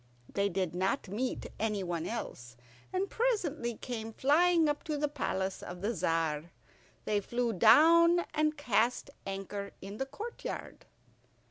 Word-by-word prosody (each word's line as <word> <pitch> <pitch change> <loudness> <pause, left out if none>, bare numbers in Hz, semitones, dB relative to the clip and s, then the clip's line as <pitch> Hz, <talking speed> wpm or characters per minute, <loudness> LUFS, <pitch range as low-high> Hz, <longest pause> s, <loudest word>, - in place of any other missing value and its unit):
They 200 0 +1
did 185 -2 -1
not 185 +1 -1
meet 245 +6 -2
any 210 -3 0
one 170 -1 -2
else, 125 - -6 0.3
and 375 +1 0
presently 335 - 0
came 225 -1 -5
flying 325 +5 +4
up 295 0 -1
to 305 -2 -1
the 295 +1 +1
palace 190 -10 -2
of 180 0 -8
the 215 +4 0
Tzar. 165 -3 0 0.6
They 210 -1 +2
flew 235 +3 -1
down 335 - +6
and 305 0 +1
cast 245 0 +1 0.2
anchor 195 +1 -5
in 200 +2 -8
the 270 - -2
courtyard. 425 - -7
230 Hz, 140 wpm, -32 LUFS, 195-300 Hz, 0.6 s, down